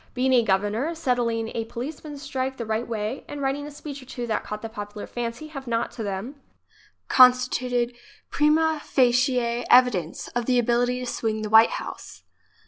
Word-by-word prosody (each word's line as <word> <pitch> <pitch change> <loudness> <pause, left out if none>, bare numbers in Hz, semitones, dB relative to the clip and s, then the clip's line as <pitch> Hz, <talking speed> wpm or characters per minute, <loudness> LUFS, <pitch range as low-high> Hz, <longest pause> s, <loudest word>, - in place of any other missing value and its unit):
Being 260 +1 +2
a 245 - +6
governor, 210 - 0
settling 240 -7 0
a 225 0 -3
policemen's 290 +4 -7
strike 265 -1 -3
the 235 - -4
right 220 +2 -2
way 220 +2 -3
and 290 - -7
writing 280 +1 -2
a - - -7
speech 290 -1 -8
or 255 - -15
two 245 -2 -5
that 225 -2 -1
caught 210 +1 -6
the - - -3
popular 205 -1 -7
fancy 240 +5 -5
have 275 -4 -8
not, 230 0 -1
to - - -8
them, 210 +8 -5 0.7
constituted 250 -1 +4 0.4
prima 310 +1 +2
facie 250 0 +3 0.3
evidence 220 -10 +3
of 240 -1 -3
the 255 -1 +3
ability 245 +1 +1
to - - -4
swing 220 -2 -2
the 215 - -4
White 220 +1 +6
House. - - -9
245 Hz, 175 wpm, -25 LUFS, 225-270 Hz, 0.7 s, a